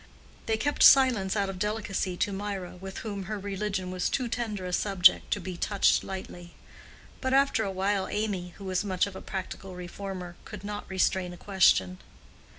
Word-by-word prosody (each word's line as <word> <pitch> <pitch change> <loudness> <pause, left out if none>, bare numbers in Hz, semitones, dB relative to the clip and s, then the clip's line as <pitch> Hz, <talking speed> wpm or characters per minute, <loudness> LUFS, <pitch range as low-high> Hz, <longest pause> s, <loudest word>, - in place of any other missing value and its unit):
They 220 -1 +1
kept 290 +7 -1
silence 240 -8 +6
out 200 -2 +1
of 190 -1 -6
delicacy 205 -3 -2
to 200 - 0
Mirah, 195 -2 -4
with 190 +1 -8
whom 200 -3 -4
her 215 +3 -3
religion 195 -1 -3
was 185 -1 -1
too 255 -2 -1
tender 220 -5 -3
a 180 - -4
subject 195 -2 +4
to - - 0
be 185 -1 -6
touched 200 +2 +2
lightly; 180 -2 -8 0.7
but 260 0 +1
after 275 -5 +3
a 200 - -2
while 195 +1 0
Amy, 195 -5 -3
who 200 - -10
was 185 +1 -1
much 185 -3 +1
of 200 -2 -8
a - - -7
practical 190 0 -6
reformer, 180 0 -7
could - - -9
not 205 0 -6
restrain 190 -1 +1
a - - -10
question. 135 - +3
195 Hz, 180 wpm, -28 LUFS, 185-210 Hz, 0.7 s, silence